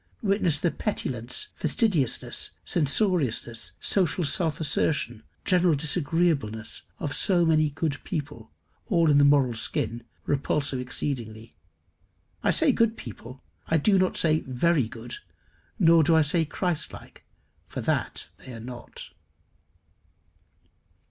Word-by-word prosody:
Witness 195 Hz, -6 st, +2 dB
the 170 Hz, +2 st, 0 dB
petulance, 135 Hz, -, -3 dB
fastidiousness, 180 Hz, -, +1 dB, 0.2 s
censoriousness, 145 Hz, -, +1 dB
social 180 Hz, -2 st, +1 dB
self 160 Hz, 0 st, +1 dB
assertion, 145 Hz, -6 st, 0 dB, 0.2 s
general 180 Hz, -3 st, +3 dB
disagreeableness 145 Hz, -, 0 dB
of 145 Hz, -, -4 dB
so 175 Hz, -3 st, +3 dB
many 155 Hz, -2 st, +3 dB
good 145 Hz, 0 st, -3 dB
people 145 Hz, -, -5 dB, 0.4 s
all 170 Hz, -5 st, +3 dB
in 145 Hz, -, +5 dB
the -, -, +5 dB
moral 140 Hz, -4 st, +4 dB
skin 115 Hz, 0 st, -3 dB, 0.2 s
repulsive 140 Hz, -1 st, -1 dB
exceedingly. 120 Hz, -3 st, -4 dB, 0.9 s
I -, -, +1 dB
say -, -, +4 dB
good 230 Hz, -1 st, +1 dB
people; 120 Hz, +3 st, -10 dB, 0.2 s
I 160 Hz, -, +2 dB
do 195 Hz, +5 st, +3 dB
not 185 Hz, 0 st, +1 dB
say 155 Hz, -1 st, +3 dB
very 130 Hz, 0 st, +1 dB
good, 120 Hz, +1 st, -8 dB, 0.6 s
nor 165 Hz, -1 st, +5 dB
do 160 Hz, +2 st, +3 dB
I 160 Hz, -, +5 dB
say 160 Hz, +3 st, +2 dB
Christ 175 Hz, +1 st, -2 dB
like, -, -, -13 dB, 0.4 s
for -, -, -5 dB
that -, -, -1 dB
they 130 Hz, -, -10 dB
are -, -, -8 dB
not. 120 Hz, +1 st, -9 dB
150 Hz, 120 wpm, -26 LUFS, 125-170 Hz, 0.9 s, in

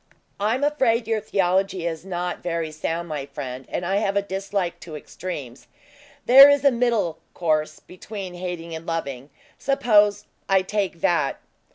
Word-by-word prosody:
"I 210 Hz, +3 st, +1 dB
am 265 Hz, -, -3 dB
afraid 255 Hz, -6 st, +2 dB
your 225 Hz, -1 st, 0 dB
theology 190 Hz, -2 st, 0 dB
is 165 Hz, -1 st, -3 dB
not 180 Hz, -1 st, -4 dB
very 165 Hz, -2 st, -2 dB
sound, 165 Hz, +2 st, -3 dB
my 145 Hz, -3 st, -4 dB
friend, 135 Hz, -2 st, -7 dB
and 175 Hz, -, -3 dB
I 195 Hz, +3 st, +1 dB
have 200 Hz, -1 st, 0 dB
a 200 Hz, -, +2 dB
dislike 195 Hz, -2 st, -3 dB
to 165 Hz, -3 st, -9 dB
extremes. 145 Hz, -7 st, -8 dB, 0.6 s
There 275 Hz, +3 st, +10 dB
is 285 Hz, -1 st, +2 dB
a 280 Hz, -, +7 dB
middle 235 Hz, -8 st, 0 dB, 0.2 s
course, 155 Hz, -2 st, 0 dB
between 190 Hz, 0 st, -8 dB
hating 175 Hz, -2 st, -6 dB
and 160 Hz, +1 st, -7 dB
loving. 140 Hz, -5 st, -4 dB, 0.3 s
Suppose 210 Hz, -7 st, +3 dB, 0.2 s
I 190 Hz, -1 st, +4 dB
take 190 Hz, -4 st, -2 dB
that?" 160 Hz, -5 st, +1 dB
180 Hz, 160 wpm, -23 LUFS, 165-210 Hz, 0.6 s, There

